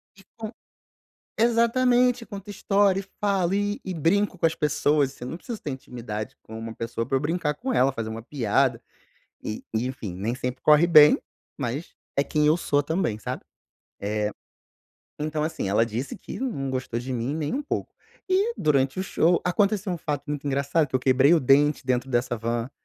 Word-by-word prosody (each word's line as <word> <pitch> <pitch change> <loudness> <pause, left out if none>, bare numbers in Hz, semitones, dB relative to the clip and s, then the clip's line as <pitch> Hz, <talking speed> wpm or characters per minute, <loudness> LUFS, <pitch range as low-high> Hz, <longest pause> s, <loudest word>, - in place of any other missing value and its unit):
E 195 - -18
com 220 0 -5 0.9
exatamente, 240 +1 +3
conto 200 -2 -9
história 200 -1 +2
e - - -12 0.2
falo 195 -3 +1
e 205 +1 0
e 190 - -4
brinco 185 +4 +1
com 165 - +1
as 160 - +2
pessoas, 145 -2 +1
eu 125 - -6
não 165 - -5
preciso 230 +2 -7
ter 145 - -4
intimidade 115 -5 -6
com 110 - -10
uma 115 0 -6
pessoa 115 0 -3
pra 135 +3 -1
eu - - -1
brincar 150 0 -1
com 255 - -3
ela, 135 - +4
fazer 115 -4 -4
uma 110 +1 -5
piada 125 0 +1 0.6
e 110 - -5
e 110 +2 0
enfim, 125 -7 -5
nem 110 +6 -2
sempre 125 0 -4
corre 150 +3 +6
bem, 150 -3 +8 0.4
mas 140 +4 -4 0.2
é 140 - +4
quem 150 0 +1
eu 155 +2 +4
sou 145 -4 +1
também, 160 - -1
sabe. - - -5 0.6
Eh, 105 +1 -1 0.9
então 150 0 -2
assim, 155 -10 -2
ela 105 +4 +3
disse 120 +4 -4
que - - -8
não 140 - -2
gostou 130 -2 -3
de 130 +2 -5
mim 125 +4 -2
nem 155 -2 -2
um 290 - -1
pouco. - - -4 0.3
E 400 +5 +2
durante 140 +1 +1
o - - 0
show, 175 -2 +2
aconteceu 200 +1 +1
um 175 - -3
fato 145 -3 -3
muito 145 -1 -3
engraçado 140 +3 +1
que 130 - -19
eu 130 - +3
quebrei 130 +5 +5
o 165 - +3
dente 140 +2 +3
dentro 125 0 0
dessa 120 -1 0
van, 115 +3 -2
145 Hz, 190 wpm, -25 LUFS, 125-185 Hz, 0.9 s, bem